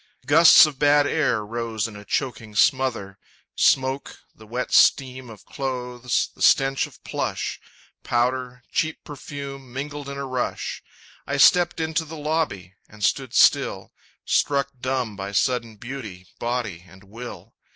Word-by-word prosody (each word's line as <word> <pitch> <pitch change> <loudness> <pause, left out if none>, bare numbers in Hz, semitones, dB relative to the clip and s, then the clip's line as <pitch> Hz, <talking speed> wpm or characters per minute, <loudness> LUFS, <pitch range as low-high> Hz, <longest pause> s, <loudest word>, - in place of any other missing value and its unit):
Gusts 160 +4 +8
of 145 -4 -6
bad 145 0 +4
air 130 -8 0
rose 115 -1 -3
in 110 - -11
a 105 - -10
choking 110 -2 -3
smother; 125 -7 +1 0.4
Smoke, 130 +1 +1 0.2
the 110 - -16
wet 125 +3 -4
steam 130 -2 +3
of 110 -3 -13
clothes, 125 -2 -2
the - - -18
stench 135 0 +3
of - - -19
plush, - - -3 0.4
Powder, 125 +1 -1
cheap 160 0 -1
perfume, 140 -2 -8
mingled 140 +2 -6
in 140 - -6
a 140 - -4
rush. 130 -2 -3 0.5
I - - -1
stepped 175 -1 +5
into 160 +1 -1
the 160 0 -9
lobby 150 - -2 0.2
and 105 0 -11
stood 130 +2 0
still - - +3 0.3
Struck 140 -1 +1
dumb 130 -4 -2
by 100 0 -6
sudden 115 0 0
beauty, 110 -6 -8
body 120 -8 -3
and 95 +1 -17
will. 115 +5 -10
125 Hz, 140 wpm, -23 LUFS, 115-140 Hz, 0.5 s, Gusts